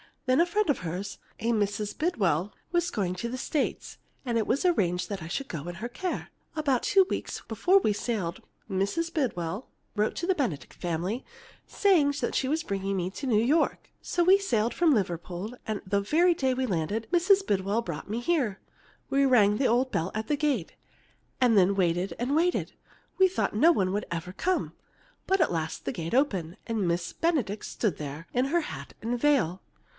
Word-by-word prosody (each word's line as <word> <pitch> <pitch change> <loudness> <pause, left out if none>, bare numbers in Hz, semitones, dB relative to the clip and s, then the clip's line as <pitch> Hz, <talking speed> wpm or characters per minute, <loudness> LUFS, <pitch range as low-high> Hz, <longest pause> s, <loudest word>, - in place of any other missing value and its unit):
Then 255 +1 +3
a 345 - +3
friend 420 +4 +1
of 290 - +2
hers, 180 +3 -5 0.2
a 230 +2 0
Mrs. 205 -1 -1
Bidwell, 200 - 0 0.2
was 345 0 +1
going 185 -3 -1
to 235 +6 -4
the 255 - -4
States, 285 +2 -2 0.3
and 235 -2 0
it 220 - 0
was 275 +8 +1
arranged 180 - +1
that 200 -3 -4
I 160 - -6
should 270 +11 -3
go 165 -1 -5
in 175 - -5
her 225 +8 -5
care. 360 +9 -4 0.3
About 280 -5 +1
two 385 -1 +5
weeks - - -3
before 380 +2 +4
we 215 - +1
sailed 205 -5 -3 0.3
Mrs. 200 - -1
Bidwell 200 - -2 0.3
wrote 210 0 +1
to 340 - -3
the 380 - +3
Benedict 245 - -3
family, 175 +8 -3 0.4
saying 335 -8 +3
she 275 -2 -1
was 315 +4 0
bringing 195 -3 -2
me 180 0 -1
to 270 +7 -5
New 220 -3 +3
York. 295 +7 +1
"So 350 - 0
we 380 +3 +6
sailed 235 - 0
from 335 -4 +4
Liverpool, 180 0 -2
and 215 -2 -2
the 200 +1 +1
very 335 - +3
day 265 -5 +1
we 260 +1 -1
landed, 205 +2 -1
Mrs. 380 +3 +4
Bidwell 200 - +1
brought 170 -4 -6
me 225 +3 -2
here. 240 - 0 0.5
We 275 0 +3
rang 210 -6 +5
the 265 - +2
old 255 +3 +2
bell 165 +3 -1
at 220 0 -3
the 295 - +1
gate, 275 - 0 0.7
and 240 -4 +5
then 195 +1 +5
waited 175 -1 +1
and 255 +4 0
waited. 345 +3 +1 0.5
I 380 - +8
thought 370 - -1
no 320 +11 +6
one 190 - +1
would 205 +2 -1
ever 170 +1 -4
come. 365 - -1 0.5
But 385 -1 +3
at 325 - +3
last 160 -2 -3
the - - -1
gate 165 +6 -3
opened, 195 - +1
and 220 -5 -1
Miss 170 0 -1
Benedict 285 - 0
stood 205 -9 -1
there 150 +3 -6
in 250 +1 +2
her 340 +5 +1
hat 300 - -7
and 235 +2 -2
veil. 235 - +2
225 Hz, 195 wpm, -28 LUFS, 185-295 Hz, 0.7 s, I